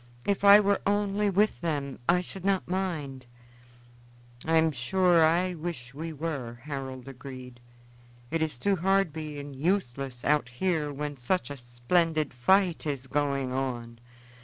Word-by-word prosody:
"If 200 -1 0
I 200 +1 +10
were 200 -1 +2
only 205 0 +1
with 205 +3 +2
them, 145 -5 -2
I 180 +1 +5
should 185 0 -8
not 195 -1 +1
mind." 155 -9 -3 1.2
"I 165 0 +3
am 160 0 +4
sure 170 +6 +3
I 175 +3 +3
wish 155 -7 -6
we 160 +3 -5
were," 140 -6 -4
Harold 135 -3 -6
agreed. 130 -2 -9 0.7
"It 165 - 0
is 155 -5 -1
too 195 +9 +1
hard 195 -2 +2
being 150 -3 -6
useless 135 -5 -2
out 145 -4 +2
here 150 +2 -1
when 145 0 -5
such 130 +2 -1
a - - -4
splendid 150 +6 0
fight 175 +6 +2
is 140 -3 -3
going 140 -1 -1
on. 120 -3 -3
150 Hz, 145 wpm, -28 LUFS, 130-180 Hz, 1.2 s, I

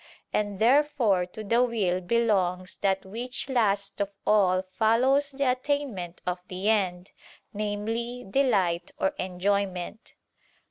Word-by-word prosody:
And 205 -2 -1
therefore 240 -6 +3
to 215 +4 -8
the 230 +4 +2
will 200 -7 0
belongs 185 -4 0
that 195 -1 0
which 240 +6 -4
last 200 -5 +1
of 200 - 0 0.2
all 190 -3 +3
follows 240 +9 +2
the 275 -2 +1
attainment 250 -10 -3
of 180 0 -2
the 190 +3 -2
end, 185 -4 -1 0.4
viz. 225 +4 -3
delight 195 -10 +2
or 190 - +2
enjoyment. 190 +2 -2
205 Hz, 120 wpm, -27 LUFS, 185-240 Hz, 0.4 s, therefore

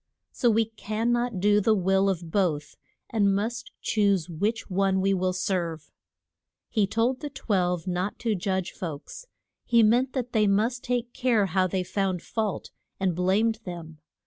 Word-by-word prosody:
So 245 - +2
we 225 0 +3
can 220 +1 -2
not 240 -4 0
do 205 +2 +4
the 220 +2 +3
will 195 +1 +2
of 170 -3 -3
both, 155 -7 0 0.4
and 200 -3 +3
must 230 +4 -3
choose 200 -5 +1
which 210 +8 -1
one 195 0 +1
we 195 +1 +2
will 185 -1 +1
serve. 180 -4 -2 0.8
He 210 -3 +2
told 235 +5 0
the 295 - -5
Twelve 180 - -1
not 180 +2 -2
to 230 -3 0
judge 190 -1 -1
folks; 180 - -7 0.4
he 235 -1 +4
meant 245 +4 +3
that 250 -2 -3
they 215 -2 +3
must 225 +5 +1
take 245 -1 -2
care 240 -5 +2
how 185 0 +1
they 185 0 -1
found 190 -1 -1
fault, 215 -4 -3 0.3
and 190 -3 +1
blamed 205 +5 +2
them. 165 -4 -8
200 Hz, 165 wpm, -26 LUFS, 185-225 Hz, 0.8 s, do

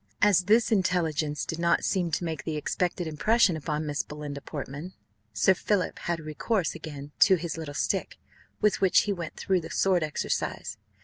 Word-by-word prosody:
As 195 -3 +4
this 225 +4 +4
intelligence 165 -7 +1
did 165 - -4
not 170 0 +2
seem 180 -3 +1
to 160 +2 -1
make 160 -5 -3
the 155 -2 -3
expected 175 +3 -1
impression 185 +5 +3
upon 155 0 -3
Miss 145 0 -1
Belinda 150 -1 -7
Portman, 145 +5 -7 0.4
Sir 105 - +4
Philip 190 +1 -1
had 170 -1 -2
recourse 160 +5 -1
again 145 -3 -8
to 190 - +7
his 170 -1 -4
little 155 -3 -6
stick, - - -1 0.4
with 210 -1 +2
which 190 -2 +5
he 205 - -1
went 170 -4 -6
through 190 -2 0
the - - -8
sword 185 -2 +2
exercise. 145 -6 -2
165 Hz, 175 wpm, -27 LUFS, 150-185 Hz, 0.4 s, to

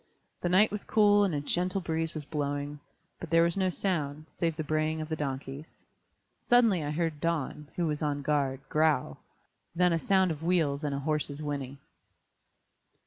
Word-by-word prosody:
The 175 - 0
night 195 +4 +5
was 210 0 -3
cool 205 -1 +4
and 185 -6 +1
a 145 - -1
gentle 180 +6 0
breeze 165 -2 -2
was 150 -2 -5
blowing, 145 -1 -3 0.4
but - - -7
there 165 0 +5
was 170 0 +1
no 190 -1 +1
sound, 155 -5 -2
save 165 -2 0
the 155 - -3
braying 155 +1 0
of 155 0 -5
the 160 - -1
donks. 140 0 -6 0.6
Suddenly 230 -9 +4
I 145 - -3
heard 155 -1 -2
Don, 155 -3 -2
who 175 -2 0
was 150 -2 -2
on 145 -2 -1
guard, 140 -2 0
growl, 155 +1 +1 0.6
then 180 0 +3
a 165 - +1
sound 190 0 +3
of 155 -1 -5
wheels 160 -4 +1
and 145 -2 -1
a - - -2
horse's 150 0 -2
whinny. 140 -2 -4
155 Hz, 180 wpm, -29 LUFS, 145-175 Hz, 0.6 s, night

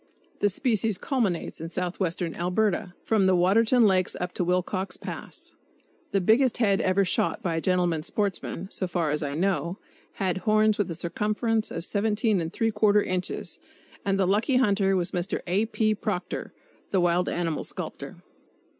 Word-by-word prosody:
The 205 - +3
species 220 -2 0
culminates 205 - -1
in 165 - -5
southwestern 180 -1 -2
Alberta, 180 +1 0
from 210 -4 +2
the 190 - +4
Waterton 220 +7 +4
Lakes 185 -2 +2
up 180 0 -3
to - - -1
Wilcox 185 +1 -1
Pass. - - -8 0.6
The 200 - +2
biggest 225 +6 +3
head 200 -5 +2
ever 190 +1 +2
shot - - 0
by 170 -3 -1
a - - -1
gentleman 175 -3 +1
sportsman, 190 0 -3
so 185 - -1
far 170 -4 0
as 150 +1 0
I 145 -1 -3
know, 180 +1 0 0.4
had 185 -3 -1
horns 215 +1 +3
with 205 - 0
a 165 - -3
circumference 215 +6 -1
of 165 - -5
17¾ 210 0 +1
inches; 185 0 -3 0.4
and 195 -1 0
the 190 - +3
lucky 210 +8 +2
hunter 200 -6 +3
was 180 -1 0
Mr. 180 +1 -2
A. 190 +5 +1
P. 215 -1 +1
Proctor, 205 -3 -4 0.4
the 190 - +2
wild 175 0 +2
animal 165 -3 -2
sculptor. - - -6
190 Hz, 155 wpm, -26 LUFS, 175-215 Hz, 0.6 s, the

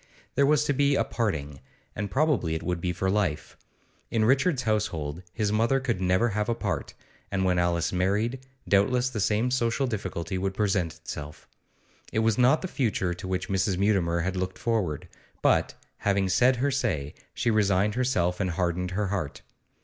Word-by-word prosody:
There 140 - +3
was 150 0 +4
to 145 - +1
be 140 +1 +3
a - - +2
parting, 75 - -2 0.4
and 100 -1 -3
probably 135 - +1
it 80 - -4
would 90 -2 -2
be 90 - 0
for 90 +2 -2
life. 95 -7 -1 0.5
In 110 -2 +1
Richard's 135 +3 +2
household 90 -8 -1
his 105 +1 -1
mother 115 +5 +2
could 120 -8 -2
never 95 +6 +2
have 105 +1 -1
a 115 - +1
part, - - -3 0.4
and 95 -1 0
when 90 -1 +2
Alice 85 0 +1
married, 105 +8 0 0.3
doubtless 125 +6 +3
the 115 - -3
same 110 +5 +1
social 125 +1 +1
difficulty 95 -5 -3
would 95 0 -2
present 95 -6 0
itself. 75 +1 -8 0.6
It - - -3
was 115 +1 +2
not 130 +8 +4
the - - -1
future 110 - 0
to 90 +1 -8
which 95 0 -2
Mrs. 95 -1 0
Mutimer 95 -4 +2
had 95 +2 -2
looked 95 0 -3
forward, 105 -11 -1 0.4
but, - - +3 0.2
having 100 -1 +1
said 125 +8 +4
her 140 +4 0
say, 95 - -1 0.2
she 120 - +1
resigned 105 -1 +2
herself 100 -8 0
and 95 -2 0
hardened 90 +1 -1
her 105 -2 0
heart. 90 -8 -3
100 Hz, 180 wpm, -27 LUFS, 90-120 Hz, 0.6 s, was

